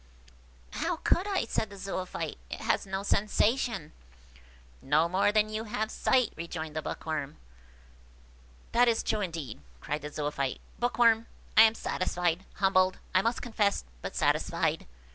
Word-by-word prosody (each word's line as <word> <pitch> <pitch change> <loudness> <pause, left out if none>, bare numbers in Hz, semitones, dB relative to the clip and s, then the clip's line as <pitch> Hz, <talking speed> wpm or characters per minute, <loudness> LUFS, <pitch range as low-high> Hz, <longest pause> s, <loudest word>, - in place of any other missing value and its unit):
"How 335 +4 -1
could 350 +4 +1
I?" 390 - 0
said 220 -1 -1
the 200 - -11
Zoophyte; 185 -1 -4
"it - - -6
has - - 0
no 190 +1 -3
sensation." 210 - +1 0.9
"No 150 +4 +3
more 190 +3 +2
than 215 0 +3
you 215 +1 -4
have 215 0 -2
sight," 255 -2 +2
rejoined 160 -2 -5
the 155 - -1
Bookworm. 150 -2 -4 1.3
"That 245 +1 +5
is 230 -1 +2
true 215 - 0
indeed," 165 - -5 0.2
cried 150 - -3
the 150 - -5
Zoophyte. 145 -3 -2 0.2
"Bookworm! 235 -2 +3 0.3
I - - +9
am 225 0 +7
satisfied–humbled, 185 +1 +1 0.2
I 185 - +5
must 230 +4 -1
confess, 215 -4 +1 0.2
but - - -6
satisfied. - - +1
195 Hz, 140 wpm, -29 LUFS, 165-225 Hz, 1.3 s, I